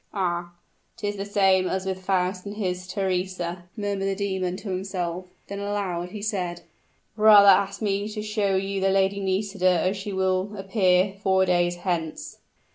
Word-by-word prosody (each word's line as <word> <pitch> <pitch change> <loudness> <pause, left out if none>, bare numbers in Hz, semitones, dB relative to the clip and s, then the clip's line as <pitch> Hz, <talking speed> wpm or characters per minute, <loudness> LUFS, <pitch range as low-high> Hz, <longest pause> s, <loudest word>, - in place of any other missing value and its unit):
"Ah! 175 -2 -2 0.4
'tis 205 -1 -3
the 195 0 -4
same 195 -2 +3
as 190 +1 -2
with 190 -1 -4
Faust 185 -1 0
and 205 - -6
his 180 -3 -3
Theresa," 185 -2 -2
murmured 200 -2 -2
the 195 - 0
demon 190 -2 -2
to 200 - -7
himself; 185 -1 -3 0.2
then 200 0 -6
aloud 200 -4 -2
he 205 +2 -8
said, 180 -5 -2 0.5
"Rather 210 -2 +8
ask 195 +2 +3
me 200 0 0
to 210 0 -5
show 210 -2 0
you 195 0 -1
the 195 - +3
Lady 195 +1 +2
Nisida 190 -2 +1
as 190 - 0
she 195 +1 -5
will 190 +2 0
appear 190 -1 +2
four 190 -1 +3
days 175 -1 +2
hence." 175 -3 -4
190 Hz, 165 wpm, -25 LUFS, 185-200 Hz, 0.5 s, Rather